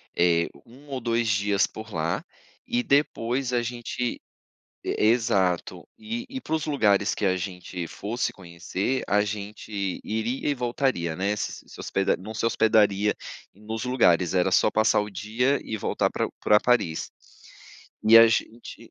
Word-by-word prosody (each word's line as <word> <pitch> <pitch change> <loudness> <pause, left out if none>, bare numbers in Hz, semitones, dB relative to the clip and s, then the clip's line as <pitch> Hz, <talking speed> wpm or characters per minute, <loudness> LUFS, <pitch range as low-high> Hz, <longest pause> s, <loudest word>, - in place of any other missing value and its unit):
eh, 85 -1 +3 0.2
1 135 +5 -17
ou 135 -2 -3
2 115 0 0
dias 100 -1 +2
por 110 -2 -10
lá, 85 - -1 0.4
e 245 0 0
depois 130 - +1
a 120 - +2
gente 120 0 -3 0.7
e - - -1
exato, 100 -6 +1
e 230 +3 -5
e 260 0 -6
para 160 - -5
os 155 - -2
lugares 105 -9 +2
que 105 - -2
a 95 -1 +2
gente 90 -1 -5
fosse 115 +4 -3
conhecer, 95 +7 -3
a 105 +1 +3
gente 100 -2 -4
iria 115 +6 -2
e - - +2
voltaria, 120 - -1
né. 100 +3 0
S 105 - -4
se - - -14
hospeda 95 0 0
não 110 +4 -8
se 110 - -2
hospedaria 105 -2 +3 0.4
nos 110 +3 -5
lugares, 90 -9 +3
era 95 +1 +2
só 105 - +4
passar 110 0 +3
o 105 0 -2
dia 115 +8 0
e 110 - -4
voltar - - 0
pra - - -1
pra 105 0 +5
Paris, 105 -10 +1 1.0
e 115 +1 +10
a 115 0 +9
gente 115 +1 -2
110 Hz, 160 wpm, -25 LUFS, 95-120 Hz, 1.0 s, e